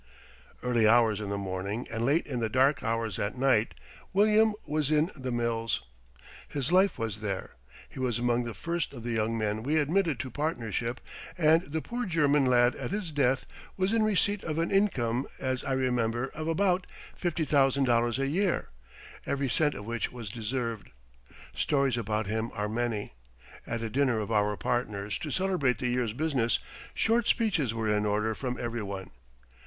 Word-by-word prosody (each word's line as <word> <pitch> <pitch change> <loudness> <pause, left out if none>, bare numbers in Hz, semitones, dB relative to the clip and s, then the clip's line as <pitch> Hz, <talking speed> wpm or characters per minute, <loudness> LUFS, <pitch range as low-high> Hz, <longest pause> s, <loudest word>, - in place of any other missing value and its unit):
Early 120 -3 +3
hours 110 -2 +4
in 100 - -4
the 100 - -1
morning 100 +4 -3
and 115 0 -2
late 145 +7 +2
in 130 -4 -3
the 115 -1 0
dark 130 +4 +3
hours 115 -3 -1
at 100 +5 -2
night 125 -4 +2 0.4
William 215 +2 +4
was 150 -1 0
in 155 +3 +2
the 130 -3 -4
mills. 115 -1 -1 0.6
His 140 +2 -2
life 190 +2 +4
was 110 -3 -3
there. 100 -3 -4 0.4
He - - -11
was 125 -3 0
among 120 0 +1
the 115 - -5
first 170 -3 -2
of 120 -4 -8
the 120 - -3
young 115 0 0
men 110 0 -1
we 145 +7 +1
admitted 160 -1 +1
to 130 - -4
partnership, 120 -4 -2 0.4
and 160 0 +3
the 160 0 -2
poor 245 0 -3
German 145 -5 +3
lad 120 0 +4
at - - -4
his 200 -5 -3
death 135 -3 +1 0.3
was 190 +3 +1
in 225 - +3
receipt 205 -1 +1
of 155 -1 -3
an 165 +1 0
income, 135 - +1
as 130 -1 -2
I 135 - -1
remember, 125 -1 0
of 155 0 -5
about 180 +2 +1 0.3
$50,000 135 - +2
a 135 - 0
year, 185 +5 0 0.6
every 140 -1 0
cent 150 +4 +2
of 100 - -7
which 115 +1 -2
was 115 -5 -7
deserved. 115 -1 -3 0.6
Stories 135 -3 +1
about 110 -2 -1
him 110 +3 -2
are 105 0 -1
many. 110 - -2 0.5
At 115 0 -3
a 115 - -2
dinner 130 -3 +2
of 105 +1 -4
our 105 -1 +2
partners 105 -5 -2
to 155 - -5
celebrate 165 -8 +1
the 125 - -1
year's 120 -3 0
business, 130 -4 +1 0.4
short 230 +1 +2
speeches 185 - +2
were 110 -2 +1
in 105 0 +1
order 105 +2 +1
from 125 +2 -4
every 120 -1 -3
one. 100 -2 -6
125 Hz, 175 wpm, -29 LUFS, 115-155 Hz, 0.6 s, hours